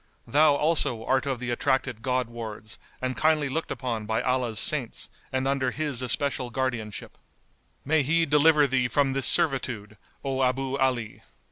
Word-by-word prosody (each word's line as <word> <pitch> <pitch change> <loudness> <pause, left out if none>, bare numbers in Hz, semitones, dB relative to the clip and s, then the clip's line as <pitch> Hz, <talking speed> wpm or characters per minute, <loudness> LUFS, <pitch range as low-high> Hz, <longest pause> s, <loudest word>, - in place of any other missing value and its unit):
[FN#188] - - -16
Thou, 150 0 +5
also, 145 -7 +1
art 130 0 +1
of 135 -3 -2
the 125 -1 -3
attracted 130 -2 0
God 125 -1 0
wards 110 -2 -7 0.2
and 130 0 -1
kindly 155 -2 +2
looked 160 +5 -3
upon 115 -5 -4
by 110 0 0
Allah's 125 -3 0
Saints 130 +1 0 0.2
and 130 0 -1
under 135 -2 +1
His 145 -2 -2
especial 130 +1 0
guardianship. 120 -5 -4 0.7
May 155 +2 +3
He 165 +4 +2
deliver 150 0 +5
thee 130 -2 +1
from 135 +1 +1
this 135 -2 +3
servitude, 115 -8 +1 0.3
O 135 -1 -1
Abu 130 +1 0
Ali!" 125 -4 -1
130 Hz, 160 wpm, -26 LUFS, 120-145 Hz, 0.7 s, Thou